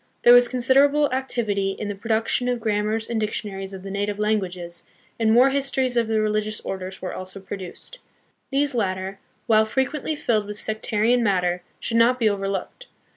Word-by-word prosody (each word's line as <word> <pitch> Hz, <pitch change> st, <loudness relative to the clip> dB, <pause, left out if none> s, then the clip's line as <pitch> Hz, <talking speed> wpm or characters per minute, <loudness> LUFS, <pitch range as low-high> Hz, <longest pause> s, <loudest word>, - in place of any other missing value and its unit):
There 240 Hz, -, +8 dB
was 245 Hz, 0 st, +7 dB
considerable 275 Hz, +3 st, +3 dB
activity 215 Hz, -7 st, -1 dB
in 210 Hz, -, -4 dB
the 205 Hz, -, -2 dB
production 225 Hz, +4 st, 0 dB
of 245 Hz, -1 st, -1 dB
grammars 215 Hz, 0 st, -1 dB
and 230 Hz, -2 st, -1 dB
dictionaries 200 Hz, -2 st, -4 dB
of 190 Hz, -1 st, -9 dB
the 195 Hz, -, -6 dB
native 205 Hz, +1 st, -2 dB
languages, 185 Hz, -5 st, -2 dB, 0.4 s
and 220 Hz, -1 st, +3 dB
more 250 Hz, +4 st, +6 dB
histories 270 Hz, -2 st, 0 dB
of 235 Hz, -2 st, +2 dB
the 220 Hz, -1 st, +1 dB
religious 215 Hz, 0 st, 0 dB
orders 190 Hz, 0 st, -6 dB
were 185 Hz, -, -3 dB
also 185 Hz, +1 st, -7 dB
produced. 195 Hz, -, -8 dB, 0.5 s
These 280 Hz, +1 st, +1 dB
latter, 190 Hz, -3 st, -2 dB, 0.3 s
while 220 Hz, -2 st, +5 dB
frequently 265 Hz, +6 st, -1 dB
filled 215 Hz, -7 st, 0 dB
with 210 Hz, 0 st, -5 dB
sectarian 220 Hz, +3 st, +1 dB
matter, 180 Hz, -5 st, +1 dB, 0.2 s
should 230 Hz, -, -1 dB
not 240 Hz, +2 st, +4 dB
be 230 Hz, -3 st, +2 dB
overlooked. 195 Hz, -, -3 dB
215 Hz, 170 wpm, -23 LUFS, 195-245 Hz, 0.5 s, There